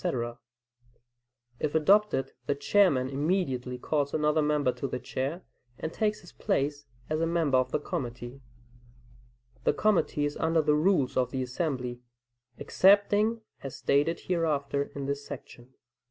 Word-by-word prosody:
] -, -, -1 dB, 1.5 s
If 150 Hz, 0 st, -2 dB
adopted, 175 Hz, -4 st, +3 dB, 0.2 s
the 145 Hz, -, +1 dB
Chairman 145 Hz, -3 st, +3 dB
immediately 135 Hz, -4 st, -1 dB
calls 140 Hz, +2 st, -1 dB
another 150 Hz, 0 st, +2 dB
member 150 Hz, -3 st, +2 dB
to 135 Hz, -, -4 dB
the 125 Hz, -, -3 dB
chair, 140 Hz, +8 st, -4 dB, 0.3 s
and 160 Hz, -, -5 dB
takes 210 Hz, -1 st, 0 dB
his 175 Hz, -, -14 dB
place 145 Hz, +1 st, -1 dB, 0.2 s
as 155 Hz, +1 st, -1 dB
a 165 Hz, -, +2 dB
member 160 Hz, -6 st, +2 dB
of 130 Hz, 0 st, -1 dB
the -, -, +1 dB
committee. 125 Hz, -5 st, -5 dB, 1.2 s
The -, -, +3 dB
committee 190 Hz, -8 st, +1 dB
is 145 Hz, -, -3 dB
under 160 Hz, 0 st, +2 dB
the 150 Hz, 0 st, +3 dB
rules 150 Hz, -4 st, +2 dB
of 125 Hz, -1 st, +2 dB
the 130 Hz, 0 st, -2 dB
assembly, 125 Hz, -2 st, -3 dB, 0.6 s
excepting 205 Hz, +3 st, +3 dB, 0.2 s
as 135 Hz, -2 st, -6 dB
stated 140 Hz, +5 st, +1 dB
hereafter 145 Hz, -5 st, 0 dB
in 140 Hz, -1 st, -4 dB
this 140 Hz, +1 st, -3 dB
section. 120 Hz, -2 st, -10 dB
145 Hz, 140 wpm, -28 LUFS, 135-170 Hz, 1.5 s, adopted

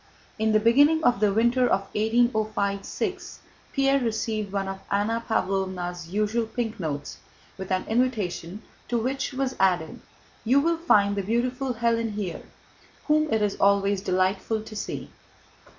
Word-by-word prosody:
In 220 Hz, 0 st, +2 dB
the 215 Hz, -, +4 dB
beginning 285 Hz, +8 st, +4 dB
of 245 Hz, -7 st, +3 dB
the 210 Hz, -1 st, +3 dB
winter 235 Hz, +4 st, +3 dB
of 195 Hz, -, +2 dB
1805 215 Hz, -3 st, +1 dB
6 -, -, -4 dB, 0.3 s
Pierre 275 Hz, 0 st, +2 dB
received 220 Hz, -3 st, -2 dB
one 195 Hz, -1 st, -2 dB
of 195 Hz, 0 st, -5 dB
Anna 225 Hz, +3 st, 0 dB
Pávlovna's 185 Hz, -4 st, -2 dB
usual 215 Hz, +4 st, 0 dB
pink 225 Hz, -2 st, -4 dB
notes 145 Hz, -4 st, -4 dB, 0.4 s
with 190 Hz, 0 st, -7 dB
an 185 Hz, 0 st, 0 dB
invitation 215 Hz, -5 st, -1 dB, 0.2 s
to 240 Hz, -, 0 dB
which 265 Hz, +5 st, -2 dB
was 265 Hz, -1 st, -2 dB
added: 180 Hz, -4 st, +1 dB, 0.4 s
"You 255 Hz, +5 st, +4 dB
will 335 Hz, +3 st, +1 dB
find 205 Hz, -12 st, +3 dB
the 200 Hz, -, -1 dB
beautiful 245 Hz, +5 st, -1 dB
Hélène 230 Hz, -1 st, 0 dB
here, 195 Hz, -5 st, -4 dB, 0.6 s
whom 305 Hz, 0 st, +2 dB
it 220 Hz, -1 st, +2 dB
is 205 Hz, -1 st, 0 dB
always 200 Hz, 0 st, +3 dB
delightful 190 Hz, +3 st, 0 dB
to 220 Hz, 0 st, -10 dB
see." 205 Hz, -, -5 dB
215 Hz, 150 wpm, -25 LUFS, 195-240 Hz, 0.6 s, the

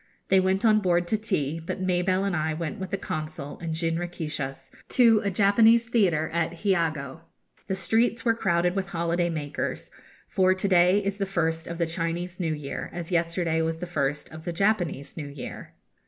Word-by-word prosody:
They 190 Hz, -, +6 dB
went 190 Hz, +3 st, +1 dB
on 215 Hz, -1 st, +5 dB
board 175 Hz, -3 st, +1 dB
to -, -, +2 dB
tea, 165 Hz, -7 st, -1 dB
but 165 Hz, -, -4 dB
Mabelle 185 Hz, +1 st, +1 dB
and 200 Hz, -3 st, 0 dB
I 155 Hz, -1 st, -1 dB
went 165 Hz, +1 st, -4 dB
with 190 Hz, -1 st, -5 dB
the 195 Hz, -, -1 dB
Consul 155 Hz, -4 st, -5 dB
in 165 Hz, -2 st, -3 dB
jinrikishas 165 Hz, -4 st, -3 dB, 0.2 s
to 230 Hz, -3 st, +5 dB
a 200 Hz, -, +1 dB
Japanese 220 Hz, +4 st, +4 dB
theatre 180 Hz, -10 st, +2 dB
at 170 Hz, 0 st, 0 dB
Hiogo. 160 Hz, -7 st, 0 dB, 0.5 s
The 190 Hz, -, -1 dB
streets 230 Hz, +4 st, +1 dB
were 230 Hz, -, +4 dB
crowded 180 Hz, -4 st, +1 dB
with 195 Hz, -1 st, -1 dB
holiday 170 Hz, 0 st, 0 dB
makers; 150 Hz, -3 st, -4 dB, 0.4 s
for 185 Hz, 0 st, +3 dB
to 190 Hz, +2 st, -1 dB
day 180 Hz, 0 st, +5 dB
is 200 Hz, +1 st, -2 dB
the 195 Hz, -, 0 dB
first 165 Hz, -3 st, -1 dB
of 170 Hz, -, -5 dB
the 170 Hz, -, +1 dB
Chinese 170 Hz, +2 st, -3 dB
new 165 Hz, -3 st, 0 dB
year, 145 Hz, -2 st, -5 dB
as 170 Hz, 0 st, -6 dB
yesterday 170 Hz, -1 st, +1 dB
was 160 Hz, 0 st, -1 dB
the 180 Hz, -, -5 dB
first 145 Hz, -4 st, -2 dB
of 160 Hz, 0 st, -10 dB
the 175 Hz, -, -3 dB
Japanese 175 Hz, -7 st, 0 dB
new 150 Hz, -3 st, -4 dB
year. 140 Hz, 0 st, -8 dB
175 Hz, 185 wpm, -26 LUFS, 160-195 Hz, 0.5 s, They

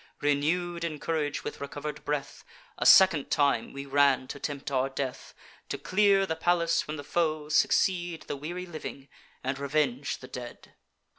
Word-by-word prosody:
Renew'd 165 Hz, +4 st, 0 dB
in 160 Hz, -3 st, -3 dB
courage 155 Hz, -2 st, -2 dB
with -, -, -6 dB
recover'd 145 Hz, +1 st, -6 dB
breath, 145 Hz, -1 st, -3 dB, 0.4 s
A -, -, +2 dB
second 170 Hz, -7 st, +7 dB
time 140 Hz, -6 st, +2 dB
we 140 Hz, 0 st, -7 dB
ran 140 Hz, -2 st, +3 dB
to 140 Hz, -, -6 dB
tempt 140 Hz, -1 st, -4 dB
our 135 Hz, 0 st, +1 dB
death, 135 Hz, -1 st, -5 dB, 0.3 s
To -, -, -2 dB
clear 195 Hz, 0 st, +3 dB
the 160 Hz, -, -2 dB
palace 170 Hz, 0 st, +2 dB
from 155 Hz, +1 st, -6 dB
the 145 Hz, -, -6 dB
foe, 155 Hz, -1 st, -1 dB
succeed 175 Hz, +1 st, +2 dB
The -, -, -5 dB
weary 175 Hz, +6 st, -5 dB
living, 155 Hz, -5 st, -8 dB, 0.3 s
and 130 Hz, +1 st, -2 dB
revenge 140 Hz, -2 st, 0 dB
the 130 Hz, -, -11 dB
dead. 125 Hz, -1 st, -9 dB
150 Hz, 160 wpm, -28 LUFS, 140-170 Hz, 0.4 s, second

